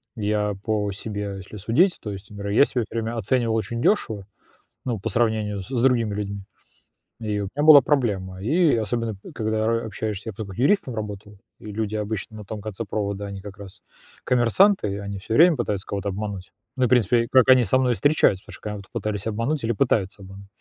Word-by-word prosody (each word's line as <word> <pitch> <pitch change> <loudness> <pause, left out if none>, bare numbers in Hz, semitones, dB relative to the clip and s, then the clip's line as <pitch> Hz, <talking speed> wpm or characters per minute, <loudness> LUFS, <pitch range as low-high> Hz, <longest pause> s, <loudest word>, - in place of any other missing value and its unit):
я 105 -1 0
по 105 -2 0
себе, 100 0 -5
если 95 +3 -10
судить, 130 - +2
то 105 - -5
есть, 100 +2 -9
например, 100 -1 -5
я 140 - +6
себя 125 -3 -1
всё - - -11
время 115 +1 -3
оценивал 115 +1 +1
очень 115 +1 -2
дёшево, 110 - +1 0.6
ну, 120 -5 -2
по - - -3
сравнению 110 -4 0
с - - -10
с 125 -3 -1
другими 120 -5 +2
людьми, 100 -1 -4 0.8
и 105 -2 -2
у - - -2
меня 145 +1 0
была 150 -3 +10
проблема, 100 -10 -1
и 155 - +3
особенно, 115 +1 -1
э, - - -10
когда 110 0 -1
ра 115 0 0
общаешься, 110 -1 -4
я - - -6
просто 100 -1 -7
как 95 - -10
юристом 140 - +2
работал, 105 -1 -7 0.2
и - - -14
люди 110 0 -3
обычно 110 0 -4
на 105 - -8
том 105 +1 -6
конце 110 +1 -5
провода, 100 0 -3
они 100 -1 -7
как 100 0 -10
раз 100 -2 -12 0.4
коммерсанты, 120 - +3
они 100 0 -5
всё 105 +3 -5
время 170 +2 +7
пытаются 105 -6 -3
кого-то 100 0 -3
обмануть, 95 -2 -5 0.2
ну, 130 - 0
и - - +6
в - - -6
принципе, 115 -1 +3
как 130 -2 +6
они 130 -1 +7
со 120 +4 +3
мной 125 -2 +2
и - - -3
встречаются, 145 -10 +3
потому - - -12
что - - -12
когда 105 -2 -5
пытались 105 -2 -3
обмануть 115 +7 -1
или 115 - +1
пытаются 105 -5 0
обмануть. 95 +1 -12
110 Hz, 215 wpm, -24 LUFS, 100-120 Hz, 0.8 s, была